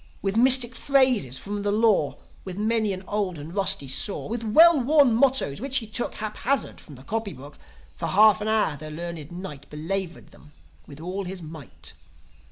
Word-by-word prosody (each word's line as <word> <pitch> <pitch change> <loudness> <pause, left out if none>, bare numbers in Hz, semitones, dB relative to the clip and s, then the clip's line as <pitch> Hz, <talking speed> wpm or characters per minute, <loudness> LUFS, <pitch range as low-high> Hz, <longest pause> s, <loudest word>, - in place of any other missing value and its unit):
With 195 0 -1
mystic 250 0 +5
phrases 255 - +1
from 205 +5 -5
the 205 0 -1
Law, 210 -8 +2 0.3
With 185 -1 -8
many 220 0 0
an 190 0 -6
old 200 -4 -2
and 150 +3 -9
rusty 195 -8 +2
saw, 140 +10 0
With 230 +1 -4
well 315 +8 +6
worn 280 -1 +4
mottoes, 250 - +1
which 270 0 +1
he 235 - 0
took 220 +3 -2
Haphazard 220 +6 -3
from 145 - -13
the 130 - -14
copy 220 +3 -4
book, 145 +3 -13 0.4
For 165 - -3
half 215 +3 +5
an 210 - -3
hour 220 -8 +1
the 155 +2 -9
learned 165 -1 -7
Knight 160 -6 -9
Belaboured 175 +4 -5
them 150 0 -19 0.3
with 140 - -12
all 185 +4 -5
his 180 -1 -6
might. 155 -4 -9
200 Hz, 180 wpm, -24 LUFS, 160-230 Hz, 0.4 s, well